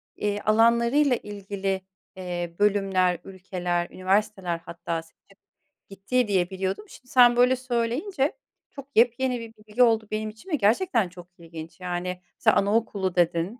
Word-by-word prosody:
eee, 205 0 -1
alanlarıyla 235 +6 +3
ilgili, 195 -2 -4 0.3
eee, 175 -2 -5
bölümler, 195 -4 +2
ülkeler, 180 -2 -3
üniversiteler 190 -2 0
hatta 165 -1 -4
seçip 165 +4 -24 0.5
gittiği 205 +5 0
diye 185 -3 +1
biliyordum. 190 - -3
Şimdi 255 - -15
sen 245 -1 +7
böyle 250 +1 +5
söyleyince 260 - -1 0.4
çok 280 -1 -10
yepyeni 245 +2 +3
1 230 -1 -9
bilgi 215 +3 +1
oldu 225 -2 +3
benim 215 0 -2
için 220 - -14
ve 310 - +1
gerçekten 230 - +2
çok 175 0 -13
ilginç, 165 0 -10
yani, 180 0 -4 0.2
sa - - +4
anaokulu 200 -3 +1
dedin. 175 +6 +1
205 Hz, 135 wpm, -25 LUFS, 180-235 Hz, 0.5 s, sen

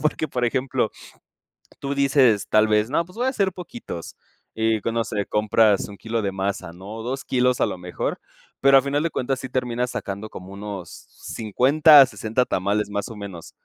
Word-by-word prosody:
porque, 155 +1 0
por 125 -4 -1
ejemplo, 130 -2 0 0.9
tú 140 0 -3
dices, 135 -7 +3
tal 110 0 +4
vez, 105 +2 +2
no, 165 - +1
pues 180 +2 -17
voy 250 +3 0
hacer 200 -8 0
poquitos, 180 - -8 0.4
y 110 -1 +1
q 115 - -2
no 115 0 0
sé, 105 -2 -2
compras 105 -1 +2
1 100 - -10
kilo 115 +4 -3
de 100 -2 -2
masa, 95 -3 -3
¿no? 100 +6 -9
2 130 +3 -4
kilos 125 -1 +1
a - - +4
lo 90 - -5
mejor, 90 0 -4 0.4
pero 135 0 +6
a - - +2
final 140 +2 0
de 165 - 0
cuentas 130 -1 -2
sí 130 - -6
terminas 125 -1 -1
sacando 100 +1 -5
como 95 +1 -10
unos 100 -3 -7 0.3
50, 140 - +5
60 110 +3 -1
tamales, 100 0 -1
más 100 0 -3
o 115 - -8
menos. 95 -5 -8
115 Hz, 190 wpm, -23 LUFS, 100-135 Hz, 0.9 s, pero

